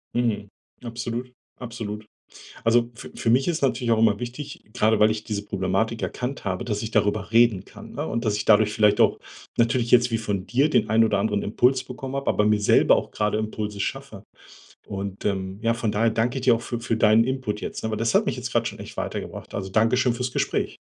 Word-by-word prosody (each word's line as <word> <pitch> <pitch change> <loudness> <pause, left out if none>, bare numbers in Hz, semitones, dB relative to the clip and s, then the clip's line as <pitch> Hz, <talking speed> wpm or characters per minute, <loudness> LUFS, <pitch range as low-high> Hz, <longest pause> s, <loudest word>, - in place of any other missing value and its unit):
Mhm. 110 -4 0 0.3
Absolut, 120 +1 -5 0.2
absolut. 110 -3 -6 0.6
Also 115 +1 +3
f 125 - -10
für 115 - -1
mich 130 +3 +3
ist 170 -2 -1
natürlich 125 -3 +1
auch 115 - +3
immer 110 -2 +3
wichtig, 130 +4 -7
grade 110 0 +2
weil 105 +1 +5
ich 110 0 -4
diese 105 -2 -4
Problematik 100 +3 -1
erkannt 125 0 -4
habe, 95 +2 -2
dass 105 -4 -2
ich 110 -1 -5
darüber 105 -1 0
reden 115 -4 +4
kann, - - -12
ne, - - -3
und 115 +1 -2
dass 105 -1 +1
ich - - -3
dadurch 105 0 +5
vielleicht 105 -1 +3
auch - - +3 0.4
natürlich 115 0 +1
jetzt 125 0 +5
wie 115 - +1
von 100 -4 -3
dir 135 +5 +2
den 110 -8 +2
einen 115 +1 +4
oder 105 -3 +2
anderen 105 0 0
Impuls 125 +5 +2
bekommen 130 +1 -7
habe, 140 0 -4
aber 105 - +2
mir 105 0 +2
selber - - +5
auch - - -3
gerade 105 0 0
Impulse 105 -1 -4
schaffe. 120 -2 -5 0.6
Und, 100 0 -6
ähm, 95 -1 -2
ja, 115 0 +2
von 115 -2 -2
daher 115 +2 +2
danke 115 +4 0
ich 130 - -6
dir 125 -2 +6
auch 115 - -8
für 120 -1 -4
für 115 -1 -1
deinen 110 0 +5
Input 130 -5 -3
jetzt, - - -6
ne? 110 - -1
Weil 110 - -2
das 115 0 0
hat - - +3
mich - - -1
jetzt - - -5
grad - - +1
schon - - -5
echt - - -10
weitergebracht. - - -5
Also 95 -1 -4
danke 115 +5 +3
schön 125 -1 +2
fürs 125 +1 -3
Gespräch. - - -1
115 Hz, 225 wpm, -24 LUFS, 105-120 Hz, 0.6 s, dir